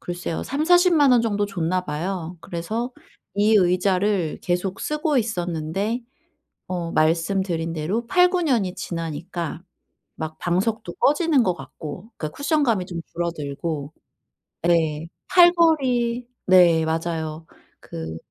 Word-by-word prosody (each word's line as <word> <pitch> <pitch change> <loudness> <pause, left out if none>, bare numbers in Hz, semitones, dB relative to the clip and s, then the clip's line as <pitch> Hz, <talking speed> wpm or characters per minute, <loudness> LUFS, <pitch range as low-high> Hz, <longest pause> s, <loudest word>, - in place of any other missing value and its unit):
글쎄요, 175 -2 -4
300,000-400,000 315 -1 +4
원 245 - +5
정도 205 -3 0
줬나 185 -2 -1
봐요. 170 +2 -4
그래서 215 +10 -4 0.4
이 210 +2 +3
의자를 185 -1 +2
계속 180 +2 -1
쓰고 300 -1 0
있었는데 190 +1 -2 0.7
어 175 -2 -3
말씀드린 165 +1 +1
대로 185 +9 -2
8-9 360 +2 +4
년이 230 - +1
지나니까 165 0 -5 0.5
막 155 0 -5
방석도 190 +2 -1
꺼지는 300 -2 +3
것 180 - +1
같고, 155 - -9
그니까 155 - -4
쿠션감이 280 - +1
좀 175 -2 -5
줄어들고 155 -2 -4 0.7
네. 160 -2 +2 0.2
팔걸이 275 -9 +4 0.2
네. 175 -3 +6
맞아요. 160 -1 -3 0.3
그 80 0 -7
180 Hz, 225 characters per minute, -23 LUFS, 165-235 Hz, 0.7 s, 네